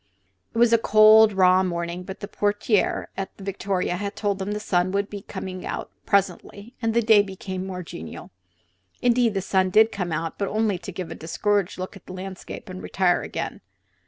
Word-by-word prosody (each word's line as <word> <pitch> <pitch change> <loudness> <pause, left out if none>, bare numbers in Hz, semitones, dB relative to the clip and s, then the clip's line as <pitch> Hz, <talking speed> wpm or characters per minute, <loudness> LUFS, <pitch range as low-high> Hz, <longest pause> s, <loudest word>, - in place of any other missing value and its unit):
It - - -3
was 235 0 +5
a 230 - +6
cold, 215 0 +7
raw 185 -1 +5
morning, 170 -1 -3
but 190 +2 -9
the 200 - -5
portiere 205 +1 0
at 195 - -5
the 195 - -11
Victoria 190 -2 -2
had 200 +1 -4
told 200 -2 -1
them 195 +2 -3
the 210 - -3
sun 185 -3 +1
would 200 0 -1
be 200 -2 -7 0.4
out - - -5 0.2
presently 200 +3 -1
and 225 -1 0
the 235 - +3
day 215 -2 +6
become 190 -1 -6
more 180 -1 -5
genial. 80 - -9 0.7
Indeed, 240 -3 +3
the 195 - 0
sun 190 -1 +2
did 220 +4 +5
come 180 -3 -3
out, 165 +1 -3
but 200 - 0
only 215 -3 0
to 180 +2 -7
give 175 -2 -6
a - - -3
discouraged 200 +4 -1
look 185 +3 -6
at 195 - -15
the - - -8
landscape 190 +3 -8
and 185 -1 -7
retire 185 -2 +1
again. - - -5
195 Hz, 195 wpm, -24 LUFS, 185-210 Hz, 0.7 s, cold